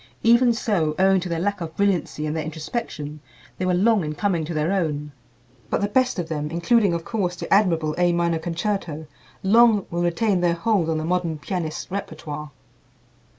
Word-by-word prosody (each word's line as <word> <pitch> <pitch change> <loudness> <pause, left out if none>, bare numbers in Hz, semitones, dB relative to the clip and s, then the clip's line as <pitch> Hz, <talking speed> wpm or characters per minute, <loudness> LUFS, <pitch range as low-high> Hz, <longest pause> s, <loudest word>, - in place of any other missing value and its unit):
Even 235 +2 +5
so, 195 -10 0
owing 190 0 +4
to 180 0 -5
their 170 - -1
lack 200 +1 -1
of 160 -1 -6
brilliancy 185 -6 0
and 155 +1 -2
their 160 - -1
introspection, 155 -2 -5 0.4
they 185 - 0
were 180 - +2
long 210 +1 +3
in 150 0 -4
coming 175 -1 0
to 155 - -5
their 155 +3 0
own. 150 -6 -1 0.6
But - - 0
the 205 - +1
best 255 +3 +1
of 175 -3 -2
them, 150 -2 -3
including, 175 +3 +2
of 165 - -5
course, 185 -6 -1
the 175 - -2
admirable 165 -6 +3
"A 175 0 +4
Minor 170 -1 +1
Concerto," 170 -2 -3 0.4
long 220 0 +5
will 170 0 -1
retain 180 +2 +1
their 175 -1 +2
hold 175 -2 +1
on 160 - 0
the 155 - -3
modern 170 -2 0
pianist's 160 +1 -4
repertoire. 155 -6 -5
175 Hz, 190 wpm, -23 LUFS, 160-200 Hz, 0.6 s, Even